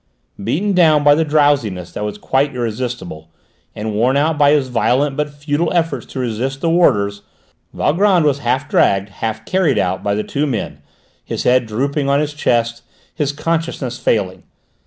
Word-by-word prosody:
Beaten 185 - 0
down 160 -5 +4
by 145 0 +6
the 160 +2 +2
drowsiness 145 - +1
that - - -5
was 105 0 -4
quite 135 +5 0
irresistible, 115 -9 -4 0.5
and 110 0 -4
worn 125 +6 +2
out 155 +3 +1
by 145 -1 +4
his 145 -3 +2
violent 125 +4 +1
but 150 +1 -1
futile 145 +3 -2
efforts 165 -8 -1
to 135 - -7
resist 130 +3 -2
the 165 - +1
warders, 100 -12 +2 0.5
Valgrand 180 +1 +2
was 145 -1 +2
half 130 +3 -1
dragged, 100 -6 +2
half 110 +2 -5
carried 185 -7 +1
out 95 0 0
by 100 0 -1
the 105 - -1
two 145 +2 -2
men, 120 -6 -4 0.4
his - - -4
head 125 -1 +3
drooping 140 +6 -1
on 140 +1 +3
his 150 0 -2
chest, 120 -5 0 0.3
his 145 -2 -1
consciousness 155 -4 -3
failing. 95 -4 0
135 Hz, 170 wpm, -18 LUFS, 110-150 Hz, 0.5 s, by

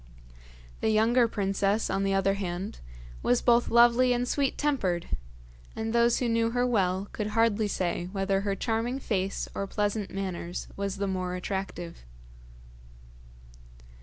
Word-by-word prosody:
The - - +1
younger 230 +3 +4
princess, 200 0 0
on 195 0 -1
the 195 0 +1
other 195 0 +2
hand, 190 0 -4 0.4
was 125 - +2
both 240 0 +4
lovely 240 +1 +5
and 245 0 -1
sweet 275 0 0
tempered, 195 -13 0 0.7
and 220 0 -3
those 235 0 +4
who 250 - 0
knew 230 0 +2
her 245 +1 +1
well 195 -5 +1
could 210 - -3
hardly 220 0 +2
say 175 -2 -2
whether 195 0 0
her 200 -1 -1
charming 230 +4 -1
face 195 -7 -2
or 195 - -3
pleasant 205 0 -1
manners 180 -3 -4
was 200 -1 -2
the 200 - -1
more 185 -2 -2
attractive. 180 - -5
205 Hz, 140 wpm, -28 LUFS, 190-230 Hz, 0.7 s, lovely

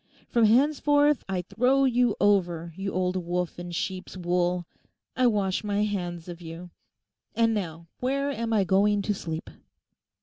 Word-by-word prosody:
From 235 -2 +3
henceforth 290 +4 +3
I 185 -2 -1
throw 255 +8 +2
you 245 -3 +2
over, 175 -5 +1
you 195 +1 -3
old 185 0 0
wolf 175 0 -2
in 175 0 -6
sheep's 185 +2 -4
wool. 175 0 0 0.5
I 255 -1 +3
wash 200 -4 0
my 205 0 0
hands 175 -5 -3
of 175 0 -8
you. 170 +1 -9 0.6
And 230 -1 +3
now 170 -5 -4
where 275 +3 0
am 230 -3 -3
I 215 -3 +3
going 200 +2 +2
to 205 - 0
sleep? 160 - -5
195 Hz, 155 wpm, -27 LUFS, 175-230 Hz, 0.6 s, From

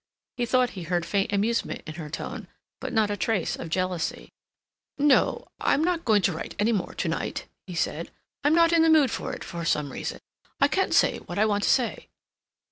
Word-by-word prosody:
He 245 -1 -1
thought 250 0 +3
he 185 - -7
heard 175 0 -1
faint 200 +3 0
amusement 215 +3 0
in 155 - -6
her 160 -2 -7
tone, 150 - -6 0.3
but - - -5
not 220 -3 +2
a - - 0
trace 200 -3 0
of 165 - -7
jealousy. 185 0 -2 0.7
"No, 285 -2 +3
I'm 300 - +2
not 345 -1 0
going 210 -4 +4
to 180 - +3
write 160 - -6
any 210 +3 +2
more 200 -6 -2
to - - -2
night," - - -3 0.2
he 180 - -6
said. 165 0 -2 0.3
"I'm 295 +2 +4
not 335 0 +5
in 335 - +5
the 325 - +5
mood 300 -6 +5
for - - -3
it - - -6
for 170 -1 -6
some 150 -4 0
reason. - - -5 0.4
I - - +4
can't - - +1
say - - +4
what 175 - -8
I 215 - +4
want 205 -1 +1
to - - +2
say." 250 -3 +1
205 Hz, 210 wpm, -26 LUFS, 175-255 Hz, 0.7 s, not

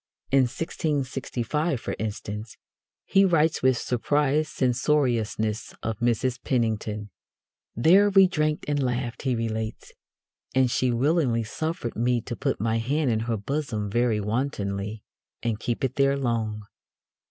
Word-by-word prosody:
In 135 -1 +5
1665, 140 -1 -2
for - - -4
instance, 105 0 -5 0.5
he 195 - +4
writes 165 -4 +3
with 130 -1 +3
surprised 145 +5 +1
censoriousness 120 -5 0
of 110 -1 -3
Mrs. 120 +1 +1
Penington: 110 -4 -1 0.7
There 185 - +5
we 195 -1 +7
drank 155 -4 0
and 145 -1 +1
laughed 120 -2 -2
[he 130 -3 0
relates], 110 -1 -3 0.6
and 130 -2 +3
she 130 - +1
willingly 125 -1 +2
suffered 155 +2 -3
me 120 +1 +1
to 120 +1 -5
put - - -1
my 115 +2 +1
hand 135 +3 +1
in 110 - +1
her 115 0 -1
bosom 110 -3 -3
very 120 -1 +2
wantonly, 105 -2 -2 0.4
and 115 -2 -1
keep 120 +4 -2
it 130 -1 -1
there 140 0 +3
long. 110 -5 -1
120 Hz, 130 wpm, -26 LUFS, 110-145 Hz, 0.7 s, we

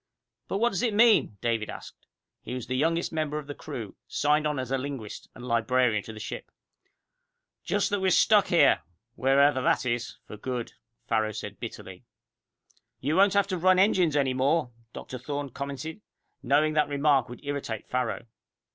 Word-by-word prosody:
"But - - -2
what 235 +3 +3
does 195 -5 -2
it 230 -4 0
mean?" 220 - +4
David 115 -2 -1
asked. - - -10 0.3
He 125 - -6
was 125 - -5
the 130 +2 -3
youngest 165 +5 0
member 155 -1 -1
of 150 - -5
the 145 - -6
crew, 110 -7 -7
signed 150 +1 +2
on 150 -1 -2
as 130 -1 -4
linguist, 135 -5 -4
and 125 - -9
librarian 115 -1 +2
to - - -7
the 110 - -10
ship. - - -6 1.1
"Just - - 0
that 205 - +1
we're 190 0 +2
stuck 210 +2 +5
here 170 - +4 0.3
where 135 +3 +2
ever 140 -2 +4
that 130 - +2
is 120 -1 -2
for 105 - -9
good!" 125 +1 -4 0.3
Farrow 110 -1 +1
said - - -7
bitterly. - - -8 1.0
"You 145 +4 -1
won't 200 +1 +5
have 200 -1 +4
to 185 -2 -2
run 185 +2 +4
engines 185 -5 +3
anymore," 135 +1 +1 0.2
Dr. 130 - -8
Thorne 140 +1 -4
commented, 140 - -6 0.4
knowing 145 +4 +2
that 150 -1 +2
remark 140 -3 +2
would 125 +4 -11
irritate 140 -7 -4
Farrow. 125 -2 -2
140 Hz, 175 wpm, -27 LUFS, 125-160 Hz, 1.1 s, stuck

